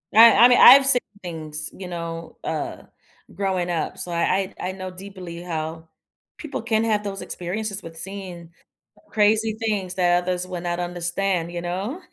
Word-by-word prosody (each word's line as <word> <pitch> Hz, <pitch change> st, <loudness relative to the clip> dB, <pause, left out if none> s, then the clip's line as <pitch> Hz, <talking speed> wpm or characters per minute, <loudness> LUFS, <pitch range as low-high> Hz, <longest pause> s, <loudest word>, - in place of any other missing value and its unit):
I 230 Hz, +1 st, +9 dB
I -, -, +10 dB
mean, 245 Hz, -, +5 dB
I've 270 Hz, +2 st, +10 dB
seen 270 Hz, -2 st, +4 dB, 0.2 s
things, 155 Hz, -3 st, -6 dB
you 190 Hz, -, -8 dB
know, 170 Hz, -1 st, -6 dB
uh, -, -, -4 dB, 0.5 s
growing 190 Hz, -2 st, -1 dB
up. 170 Hz, -2 st, -2 dB
So, 175 Hz, -, -6 dB
I 185 Hz, +3 st, 0 dB
I 180 Hz, -, -3 dB
I -, -, -2 dB
know 185 Hz, -1 st, -6 dB
deeply 185 Hz, -2 st, -9 dB
how 160 Hz, -1 st, -5 dB, 0.5 s
people 310 Hz, -4 st, -5 dB
can 225 Hz, -1 st, +1 dB
have 215 Hz, -2 st, +1 dB
those 195 Hz, -1 st, -5 dB
experiences 200 Hz, +3 st, -4 dB
with 165 Hz, 0 st, -10 dB
seeing 180 Hz, -3 st, -8 dB, 0.6 s
crazy 215 Hz, +1 st, +2 dB
things 205 Hz, -5 st, -2 dB
that 175 Hz, -1 st, +3 dB
others 180 Hz, 0 st, -2 dB
would 180 Hz, -1 st, -6 dB
not 175 Hz, 0 st, -2 dB
understand, 175 Hz, 0 st, -2 dB
you 175 Hz, 0 st, -4 dB
know? 195 Hz, -, -4 dB
185 Hz, 170 wpm, -23 LUFS, 175-205 Hz, 0.6 s, I